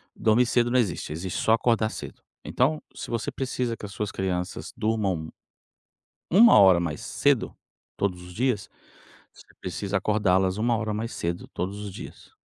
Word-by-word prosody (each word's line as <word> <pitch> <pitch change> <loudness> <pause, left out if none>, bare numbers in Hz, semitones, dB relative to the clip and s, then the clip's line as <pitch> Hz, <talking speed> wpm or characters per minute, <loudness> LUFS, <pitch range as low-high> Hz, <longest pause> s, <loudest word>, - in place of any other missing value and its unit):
dormir 115 +3 +3
cedo 120 0 +2
não 125 - +4
existe, 85 -8 -1
existe 85 +4 -4
só 110 - +2
acordar 115 -1 +2
cedo. - - -8 0.2
Então, 150 +5 +1
se - - -7
você 115 -2 -2
precisa 125 -3 -2
que 105 - -9
as 100 - -8
suas 105 0 -3
crianças 90 -1 -3
durmam 100 -8 -1 1.0
1 220 - +7
hora 95 -3 +7
mais 80 -4 -3
cedo - - +1 0.4
todos 90 -3 -2
os 90 0 -11
dias, 120 -4 -1 0.6
você - - -17 0.2
precisa 95 +2 -4
acordá-las 95 -2 +2
1 120 +2 +2
hora 105 -1 -2
mais 115 +2 -3
cedo 85 +1 -3
todos 100 +3 -3
os 100 -2 -6
dias. - - -10
105 Hz, 165 wpm, -26 LUFS, 95-115 Hz, 1.0 s, 1